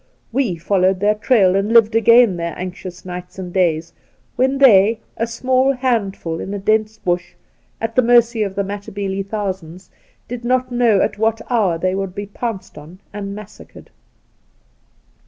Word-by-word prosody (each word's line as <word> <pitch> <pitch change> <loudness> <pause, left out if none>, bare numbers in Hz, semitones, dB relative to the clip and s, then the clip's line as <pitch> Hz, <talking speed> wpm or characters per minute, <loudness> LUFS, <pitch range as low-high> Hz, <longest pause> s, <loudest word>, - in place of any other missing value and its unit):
We 235 -7 0
followed 185 +2 +1
their 205 +2 +3
trail 210 -4 +3
and 195 +3 0
lived 225 -1 +5
again 230 -2 +5
their 170 0 -4
anxious 180 0 -7
nights 180 0 -8
and 180 -2 -7
days, 170 -3 0 0.4
when 265 +2 +1
they, 220 -5 +5 0.2
a 230 - -2
small 260 +3 +1
handful 205 -10 -2
in 200 - -5
a - - -2
dense 215 +2 0
Bush, 175 0 -3 0.4
at 225 0 -3
the 255 - +5
mercy 235 -1 +3
of 195 -2 -2
the 200 - 0
Matabele 200 -1 -4
thousands, 190 -4 -5 0.4
did 245 0 -6
not 255 +1 0
know 235 -5 +3
at - - -3
what 225 0 +1
hour 200 -8 +2
they 185 +2 -1
would 195 -1 -4
be 205 0 -4
pounced 205 -5 -6
on 160 +5 -13 0.2
and 200 -1 -5
massacred. 210 0 -13
205 Hz, 160 wpm, -19 LUFS, 185-230 Hz, 0.4 s, lived